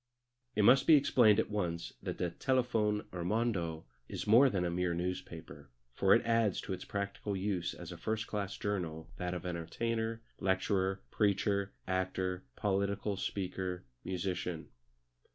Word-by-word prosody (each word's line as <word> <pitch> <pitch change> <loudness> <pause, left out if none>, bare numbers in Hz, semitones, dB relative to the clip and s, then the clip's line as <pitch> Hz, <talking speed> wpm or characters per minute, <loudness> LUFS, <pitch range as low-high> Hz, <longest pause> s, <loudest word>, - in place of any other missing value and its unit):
It 105 - +3
must 125 +6 +6
be 160 - +9
explained 120 -7 +5
at 110 - 0
once 85 -5 -2
that - - -4
the 90 -2 -1
Telefon 115 -4 +1
Hirmondo 90 -3 -1 0.2
is - - -4
more 120 +6 +7
than 95 -6 0
a 85 - 0
mere 90 0 0
newspaper, 90 +2 -5 0.2
for - - +5
it - - +1
adds 115 -3 +2
to 95 - -4
its 95 - -5
practical 100 0 -3
use 95 -2 -1
as 90 -1 -8
a 90 - -7
first 110 +5 -2
class 100 -2 -3
journal 85 -6 -3
that 90 0 -2
of 90 0 -6
entertainer, 110 +7 -2 0.2
lecturer, 95 0 +1
preacher, 100 -1 +1
actor, 95 0 -1
political 100 0 0
speaker, 95 -2 -3 0.2
musician. 90 -2 -3
95 Hz, 145 wpm, -33 LUFS, 90-105 Hz, 0.2 s, be